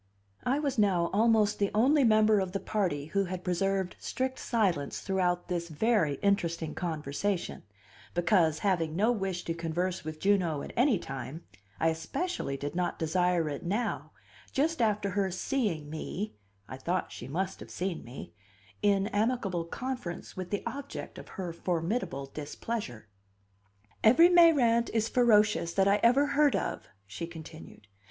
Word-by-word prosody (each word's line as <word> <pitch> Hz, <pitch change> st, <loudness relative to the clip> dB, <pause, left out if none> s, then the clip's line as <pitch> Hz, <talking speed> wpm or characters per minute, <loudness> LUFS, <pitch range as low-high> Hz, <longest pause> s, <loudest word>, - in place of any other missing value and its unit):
I 265 Hz, +3 st, +2 dB
was 280 Hz, -5 st, -1 dB
now 185 Hz, -5 st, +2 dB
almost 215 Hz, -1 st, +3 dB
the 200 Hz, -1 st, +2 dB
only 275 Hz, +6 st, +4 dB
member 215 Hz, -2 st, +5 dB
of 190 Hz, -1 st, -2 dB
the 195 Hz, -, -1 dB
party 180 Hz, -11 st, -1 dB
who 200 Hz, 0 st, +2 dB
had 180 Hz, 0 st, -5 dB
preserved 190 Hz, +1 st, 0 dB
strict 260 Hz, 0 st, -3 dB
silence 185 Hz, -, 0 dB
throughout 180 Hz, -2 st, 0 dB
this 170 Hz, -1 st, -3 dB
very 165 Hz, -3 st, +2 dB
interesting 170 Hz, -5 st, 0 dB
conversation, 170 Hz, +3 st, -2 dB, 0.5 s
because, 175 Hz, -3 st, +3 dB
having 165 Hz, -5 st, +1 dB
no 215 Hz, +6 st, +3 dB
wish 195 Hz, -5 st, -2 dB
to 165 Hz, -, -2 dB
converse 170 Hz, +2 st, -2 dB
with 155 Hz, 0 st, -6 dB
Juno 180 Hz, -7 st, +1 dB
at -, -, -8 dB
any 245 Hz, -2 st, +4 dB
time, 135 Hz, 0 st, -7 dB, 0.4 s
I 165 Hz, -, +3 dB
especially 160 Hz, -, -3 dB
did 145 Hz, +1 st, -4 dB
not 180 Hz, 0 st, -1 dB
desire 175 Hz, 0 st, +1 dB
it 145 Hz, -2 st, -4 dB
now, 210 Hz, +7 st, -2 dB, 0.4 s
just 310 Hz, +2 st, 0 dB
after 210 Hz, -3 st, +1 dB
her 195 Hz, 0 st, 0 dB
seeing 185 Hz, -, -1 dB
me 165 Hz, +6 st, -5 dB, 0.3 s
(I 130 Hz, -, -7 dB
thought 175 Hz, +7 st, -2 dB
she 120 Hz, -, -8 dB
must 185 Hz, +7 st, -3 dB
have -, -, -10 dB
seen 180 Hz, -2 st, -3 dB
me) 120 Hz, +3 st, -9 dB, 0.5 s
in 200 Hz, -1 st, +3 dB
amicable 205 Hz, -5 st, 0 dB
conference 245 Hz, -3 st, -5 dB
with 185 Hz, -1 st, -5 dB
the 205 Hz, -, -2 dB
object 280 Hz, +1 st, -6 dB
of -, -, -11 dB
her 180 Hz, -3 st, -4 dB
formidable 170 Hz, -, -2 dB
displeasure. 145 Hz, -, -5 dB, 1.0 s
"Every 325 Hz, +11 st, +7 dB
Mayrant 280 Hz, -10 st, +5 dB
is 225 Hz, 0 st, +2 dB
ferocious 210 Hz, -8 st, +3 dB
that 195 Hz, 0 st, +4 dB
I 200 Hz, +1 st, +5 dB
ever 250 Hz, +5 st, +5 dB
heard 290 Hz, 0 st, +3 dB
of," -, -, -3 dB, 0.2 s
she 100 Hz, +12 st, -6 dB
continued. 160 Hz, -, -11 dB
190 Hz, 150 wpm, -30 LUFS, 165-220 Hz, 1.0 s, Every